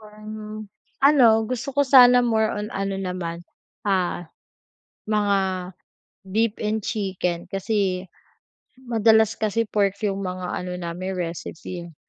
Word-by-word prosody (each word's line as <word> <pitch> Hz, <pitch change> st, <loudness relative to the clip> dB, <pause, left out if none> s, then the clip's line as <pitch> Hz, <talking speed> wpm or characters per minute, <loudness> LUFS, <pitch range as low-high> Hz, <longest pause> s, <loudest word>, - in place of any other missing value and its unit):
Parang, 215 Hz, 0 st, -9 dB, 0.4 s
ano 275 Hz, -4 st, +7 dB, 0.2 s
gusto 255 Hz, +3 st, -4 dB
ko 285 Hz, -, +5 dB
sana 250 Hz, -2 st, +7 dB
more 220 Hz, -2 st, +2 dB
on 210 Hz, +1 st, -4 dB
ano 195 Hz, 0 st, -2 dB
naman, 180 Hz, -3 st, -4 dB, 0.4 s
ah, 185 Hz, -3 st, 0 dB, 0.8 s
mga 205 Hz, -2 st, +2 dB, 0.9 s
beef 215 Hz, +3 st, +1 dB
and 215 Hz, +1 st, 0 dB
chicken. 185 Hz, -5 st, -2 dB
Kasi 195 Hz, -2 st, -1 dB, 0.8 s
madalas 220 Hz, -1 st, +4 dB
kasi 220 Hz, +1 st, 0 dB
pork 200 Hz, -2 st, 0 dB
yung 195 Hz, -1 st, -1 dB
mga 185 Hz, -1 st, -4 dB
ano 180 Hz, 0 st, -4 dB
namin 180 Hz, +2 st, -5 dB
recipe, 170 Hz, 0 st, -6 dB
eh. 165 Hz, -, -16 dB
205 Hz, 120 wpm, -23 LUFS, 185-220 Hz, 0.9 s, ano